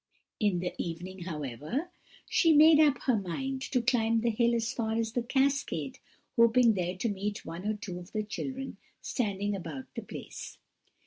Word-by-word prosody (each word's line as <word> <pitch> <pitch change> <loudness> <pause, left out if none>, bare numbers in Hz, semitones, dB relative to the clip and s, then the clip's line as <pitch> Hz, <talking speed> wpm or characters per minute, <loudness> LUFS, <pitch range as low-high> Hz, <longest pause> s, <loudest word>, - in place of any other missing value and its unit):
"In 200 -5 +2
the 180 - -2
evening, 175 +2 -6
however, 155 - -4 0.4
she 330 -3 +4
made 305 +1 +8
up 295 -3 +4
her 255 - +3
mind 260 +8 -3
to 250 -3 +2
climb 230 -2 +2
the 235 0 +2
hill 235 +2 +2
as 230 -1 -1
far 220 -2 -1
as 225 -1 0
the 245 - 0
cascade, 265 - 0 0.4
hoping 235 0 +6
there 180 -1 -2
to 210 - -1
meet 205 0 -3
one 170 +5 -5
or 215 - +1
two 185 -4 -6
of 180 +2 -12
the 215 -1 -1
children 265 +5 -5 0.2
standing 205 -4 -1
about 160 -8 -6
the - - -4
place. - - -8
220 Hz, 175 wpm, -30 LUFS, 180-250 Hz, 0.4 s, made